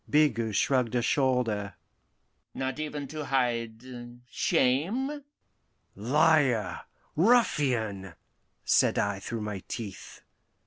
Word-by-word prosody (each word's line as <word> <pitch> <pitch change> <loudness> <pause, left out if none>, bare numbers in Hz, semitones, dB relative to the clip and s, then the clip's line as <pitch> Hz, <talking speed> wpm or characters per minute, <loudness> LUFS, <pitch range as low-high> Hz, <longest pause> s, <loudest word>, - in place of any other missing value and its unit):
Bigot 115 -8 +2
shrugged 125 -1 +1
a 120 - +1
shoulder. 115 - 0 0.8
"Not 130 +2 -3
even 150 -2 -4
to 155 +1 -5
hide 120 -4 -1 0.5
shame?" 210 - 0 0.7
"Liar 135 - +2 0.4
ruffian!" 125 - +2 0.5
said - - +3
I 100 -1 0
through 115 +3 -5
my 105 -2 -4
teeth. 105 -5 -7
125 Hz, 90 wpm, -28 LUFS, 110-150 Hz, 0.8 s, said